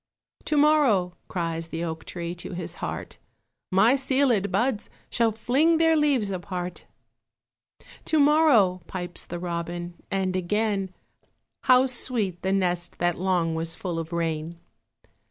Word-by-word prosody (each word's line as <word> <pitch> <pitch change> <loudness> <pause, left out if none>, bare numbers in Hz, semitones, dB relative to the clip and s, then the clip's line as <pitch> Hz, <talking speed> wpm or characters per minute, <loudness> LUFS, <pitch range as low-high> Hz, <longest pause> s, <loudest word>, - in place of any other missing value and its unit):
To 300 - +1
morrow! 270 -13 +3
cries 165 -2 -3
the 165 0 -4
oak 160 -1 -5
tree 170 -1 -5
To 175 +1 -7
his 175 -1 -5
heart, - - -5 0.5
My 195 +6 +5
sealèd 260 -6 +2
buds 220 +3 0 0.2
shall 230 -2 +2
fling 270 +9 +2
Their 325 0 +4
leaves 280 -9 +2
apart. 180 -2 -5 1.2
To 315 - +1
morrow! 280 - +4
pipes 175 -2 -5
the 175 - -5
robin, 175 0 -4 0.2
And 190 -1 -1
again 195 +1 0 0.7
How 255 0 +6
sweet 235 -8 -1
the 190 - -1
nest 180 -2 0
that 175 -1 0
long 180 -3 +1
Was 165 0 -3
full 175 -2 -4
of 165 0 -6
rain. 165 -1 -2
185 Hz, 135 wpm, -25 LUFS, 175-245 Hz, 1.2 s, How